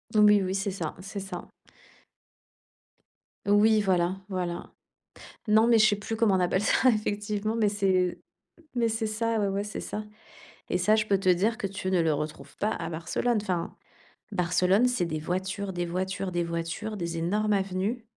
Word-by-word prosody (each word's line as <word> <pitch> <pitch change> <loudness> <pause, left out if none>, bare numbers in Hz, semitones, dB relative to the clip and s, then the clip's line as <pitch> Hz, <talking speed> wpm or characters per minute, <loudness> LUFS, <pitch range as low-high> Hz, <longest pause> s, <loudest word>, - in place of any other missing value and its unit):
Oui 210 -1 +6
oui, 190 0 -1
c'est 195 0 -1
ça, 170 -5 -4
c'est 200 +1 -6
ça. 190 -2 -7 2.0
Oui, 210 +1 +5
voilà, 185 -1 +1
voilà. 180 -3 -4 0.7
Non, 220 +2 +5
mais 230 -2 +5
je 215 - +7
sais 205 - +3
plus 210 +2 -4
comment 220 -4 +3
on - - +2
appelle 185 +2 +1
ça 255 - +4
effectivement, 210 -1 -1
mais 215 -3 +2
c'est 190 -3 +1 0.6
mais 230 -1 +2
c'est 220 0 -1
ça, 225 +1 -1
ouais, 200 - +1
ouais, 195 +1 -1
c'est 210 - -5
ça. 210 0 -5 0.7
Et 180 - +1
ça, 210 +5 +3
je 215 -1 +1
peux 195 -2 +2
te 185 - +1
dire 205 +6 +2
que 200 - -2
tu 190 -1 -4
ne 180 -2 +3
le 160 -1 +2
retrouves 150 +1 -5
pas 210 - 0
à - - -3
Barcelone. 175 +8 -1
Enfin, 180 -4 -3 0.6
Barcelone, 180 +4 +3
c'est 245 -8 0
des 155 -2 -3
voitures, 185 +4 -3
des 175 0 -2
voitures, 185 +2 -3
des 175 0 0
voitures, 170 +6 -4
des 170 -2 -3
énormes 210 +6 0
avenues. 195 +4 -1
195 Hz, 180 wpm, -27 LUFS, 180-215 Hz, 2.0 s, je